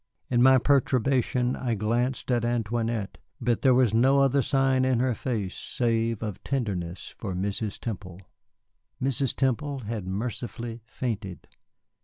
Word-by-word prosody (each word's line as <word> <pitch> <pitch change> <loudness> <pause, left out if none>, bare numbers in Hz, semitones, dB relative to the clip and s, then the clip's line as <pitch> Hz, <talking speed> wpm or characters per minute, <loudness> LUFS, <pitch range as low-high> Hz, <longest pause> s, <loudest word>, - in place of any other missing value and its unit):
In 120 -1 +3
my 130 +1 +7
perturbation 130 -1 +2
I 120 -3 -1
glanced 120 +5 -1
at 120 -2 +2
Antoinette, 115 -2 -1 0.2
but 120 -3 0
there 130 -2 +5
was 125 -4 +3
no 130 +5 +4
other 135 +1 +3
sign 135 -1 +2
in 130 -2 +2
her 130 0 +2
face 105 -5 -3
save 115 -2 -1
of 105 -4 -5
tenderness 95 -10 -3
for 95 -5 -4
Mrs. 100 +3 -2
Temple. 95 -5 -6 0.8
Mrs. 135 0 0
Temple 135 +1 0
had 105 -4 -4
mercifully 115 +3 -4
fainted. 110 -7 -4
120 Hz, 135 wpm, -27 LUFS, 110-130 Hz, 0.8 s, my